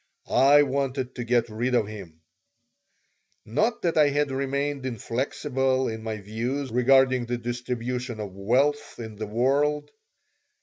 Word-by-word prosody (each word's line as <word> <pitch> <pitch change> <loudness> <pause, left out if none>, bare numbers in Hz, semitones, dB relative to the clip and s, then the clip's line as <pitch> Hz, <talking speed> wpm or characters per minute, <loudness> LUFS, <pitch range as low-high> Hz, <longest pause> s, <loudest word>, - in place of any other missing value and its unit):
I 145 +2 +6
wanted 135 -2 -2
to 125 - -5
get 120 0 +2
rid 120 +3 -1
of 115 - +3
him 95 -7 -10 1.2
Not 220 - 0
that 170 -2 +2
I 150 -1 +6
had 145 0 0
remained 140 +1 -2
inflexible 130 +2 -1
in 110 0 -5
my 110 -1 -4
views 120 +7 -3
regarding 130 0 +4
the 120 0 -1
distribution 120 0 -4
of 100 -3 -5
wealth 130 +9 0
in 110 -3 -8
the 110 0 -4
world. 140 +7 +1
125 Hz, 135 wpm, -26 LUFS, 115-140 Hz, 1.2 s, I